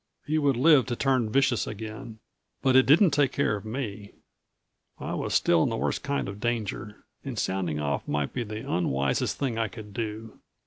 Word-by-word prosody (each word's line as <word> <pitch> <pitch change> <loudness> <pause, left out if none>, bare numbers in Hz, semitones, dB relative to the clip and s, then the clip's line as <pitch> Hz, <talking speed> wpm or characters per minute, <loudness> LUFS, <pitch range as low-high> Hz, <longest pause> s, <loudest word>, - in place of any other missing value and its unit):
He 155 +1 +1
would 140 -4 +2
live 140 -1 +5
to 120 - -2
turn 130 -3 +1
vicious 135 -2 +2
again. 110 +2 -7 0.5
But 130 -1 +3
it 130 - +6
didn't 165 +5 +6
take 140 -2 +2
care 140 -7 +1
of 100 - -7
me. 110 -3 -5 0.8
I - - -5
was - - -2
still - - +4
in - - +2
the - - -2
worst - - -1
kind 140 0 -2
of 100 +1 -7
danger, 110 -2 -3 0.2
and 135 -4 -6
sounding 95 -6 -1
off 70 -1 -2
might 75 -1 -1
be 125 - -2
the 110 +3 -7
unwisest 70 - 0
thing 125 -5 -2
I 115 - +1
could 105 +1 -11
do. 110 0 -5
115 Hz, 190 wpm, -27 LUFS, 105-135 Hz, 0.8 s, it